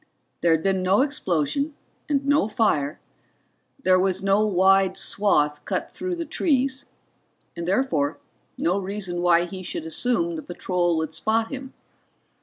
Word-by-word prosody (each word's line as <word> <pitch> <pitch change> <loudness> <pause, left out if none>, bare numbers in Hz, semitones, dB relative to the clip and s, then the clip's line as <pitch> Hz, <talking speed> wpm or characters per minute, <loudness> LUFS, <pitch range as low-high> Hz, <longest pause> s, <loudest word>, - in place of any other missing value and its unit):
There 170 - +3
had 160 0 0
been 190 -1 +1
no 190 +5 +3
explosion 280 - -1 0.3
and 280 -2 +1
no 285 -6 +3
fire, 155 -10 0 0.8
there 185 0 +4
was 190 0 0
no 195 +2 +3
wide 190 -1 +3
swath 150 -8 +1
cut - - -3
through 365 0 -4
the 335 -1 -4
trees 275 -4 0 0.7
and 170 0 -5
therefore 170 - +1 0.4
no 180 +4 +1
reason 190 -2 -3
why 175 -1 +4
he 185 +1 -7
should 170 -3 -5
assume 170 -1 0
the - - -5
patrol 175 -1 -1
would 160 0 -2
spot 225 +5 0
him. 265 -1 -7
190 Hz, 145 wpm, -24 LUFS, 170-245 Hz, 0.8 s, there